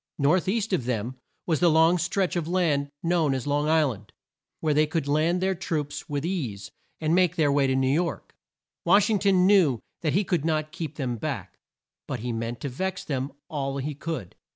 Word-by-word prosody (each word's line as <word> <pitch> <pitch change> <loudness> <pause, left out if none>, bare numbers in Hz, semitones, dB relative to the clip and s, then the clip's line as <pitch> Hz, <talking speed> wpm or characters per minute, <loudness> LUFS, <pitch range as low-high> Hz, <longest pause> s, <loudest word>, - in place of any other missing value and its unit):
North 155 +6 +2
east 210 +1 0
of 130 -10 0
them 125 +1 -2 0.3
was 160 -3 +1
the 175 - +5
long 165 +2 +4
stretch 185 +2 0
of 170 -3 -1
land 160 -6 +1
known 165 -5 +2
as 130 - -3
Long 145 +1 +1
Isl 155 -4 +3
and, 105 -1 -15 0.5
where 155 -2 +1
they 155 +1 +3
could 160 -2 -2
land 160 +5 +2
their 190 0 +2
troops 155 -5 -4
with 145 +1 -2
ease, 130 - -3 0.3
and 155 0 +1
make 180 -1 +3
their 155 -4 +3
way 140 -1 +3
to 130 - +1
New 130 0 +2
York. 170 +3 -2 0.5
Wash 205 +2 +4
ing 210 - +2
ton 190 -2 +4
knew 180 - +4 0.2
that 155 -4 0
he 200 - +3
could 175 -6 0
not 155 -1 0
keep 160 -2 -5
them 125 -5 -2
back, - - -4 0.5
but 125 - -4
he 120 0 -3
meant 115 +1 -4
to - - -2
vex 185 +8 -3
them 135 -1 -3 0.2
all 140 -4 -3
he 145 +2 -3
could. 145 - -5
155 Hz, 205 wpm, -26 LUFS, 135-175 Hz, 0.5 s, the